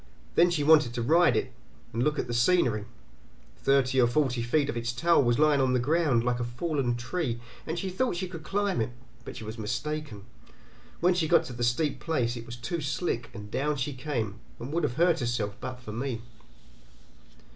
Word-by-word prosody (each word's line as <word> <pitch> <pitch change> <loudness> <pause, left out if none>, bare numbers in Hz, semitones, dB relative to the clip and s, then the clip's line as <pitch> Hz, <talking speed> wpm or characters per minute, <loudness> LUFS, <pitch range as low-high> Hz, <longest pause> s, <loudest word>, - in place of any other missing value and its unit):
Then 175 +1 +5
she 165 -4 0
wanted 150 -5 +5
to 120 - -1
ride 165 +7 +4
it, 130 - -2 0.4
and 115 - -1
look 150 +3 +1
at - - -1
the 120 - -4
scenery. 120 - +2 0.7
Thirty 135 -1 +3
or 120 - +5
forty 130 -2 +1
feet 140 +5 +1
of - - -3
its 120 0 -2
tail 170 +8 +4
was 120 -2 +2
lying 150 -2 +4
on 130 -1 +2
the 125 - +3
ground, 145 -3 +2
like 125 0 0
a - - -1
fallen 120 +1 -1
tree, 120 0 -2 0.3
and 165 +2 -2
she 190 +2 -3
thought 240 +3 0
she 185 +2 -3
could 170 -3 -8
climb 195 - 0
it, 110 - -1 0.3
but - - -8
she - - -7
was 110 +1 -7
mistaken; 130 -1 -4 0.8
when 180 +2 +4
she 170 -3 0
got - - +5
to 125 - -8
the 120 0 -3
steep 135 +5 +1
place 125 -8 -1
it 115 -1 -8
was 115 - -6
too 155 +7 -4
slick 140 -4 -2
and 105 -1 -9
down 150 +2 0
she 140 +1 -2
came, 120 -6 -3 0.2
and 130 +5 -7
would 170 - +1
have 125 -4 -2
hurt 170 +1 +3
herself 120 -5 -1
but 125 -1 -5
for 120 -3 -8
me. 120 0 -3
130 Hz, 210 wpm, -28 LUFS, 120-155 Hz, 0.8 s, Then